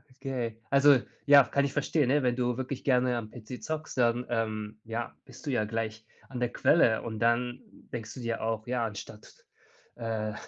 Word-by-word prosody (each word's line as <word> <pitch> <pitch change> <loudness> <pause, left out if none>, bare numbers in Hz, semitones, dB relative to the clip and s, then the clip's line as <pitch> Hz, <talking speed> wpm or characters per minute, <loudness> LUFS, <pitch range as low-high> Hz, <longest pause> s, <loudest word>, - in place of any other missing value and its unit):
Okay. 130 -5 -4
Also 140 -1 +6 0.3
ja, 145 -1 +9
kann 140 +3 +1
ich 140 - -3
verstehen, 145 -1 +1
ne? 145 +1 +3
Wenn 125 -1 +2
du 125 -1 0
wirklich 130 0 -4
gerne 125 -2 +2
am 110 -2 -6
PC 120 +1 -9
zockst, 155 -2 -4
dann, 120 0 +2
ähm, 110 -2 -2
ja, 115 +1 -4
bist 130 +3 -14
du 145 - -1
ja 110 -4 +1
gleich 110 0 -4 0.2
an 125 - -5
der 120 -1 0
Quelle 120 -9 +4
und 110 -2 -5
dann 120 +2 +1 0.3
denkst 115 -2 -5
du - - -9
dir 115 -2 -3
auch, 110 0 -2
ja, 120 -1 0
anstatt, 105 0 -9 0.5
äh, 110 -2 -3
120 Hz, 190 wpm, -29 LUFS, 115-130 Hz, 0.5 s, ja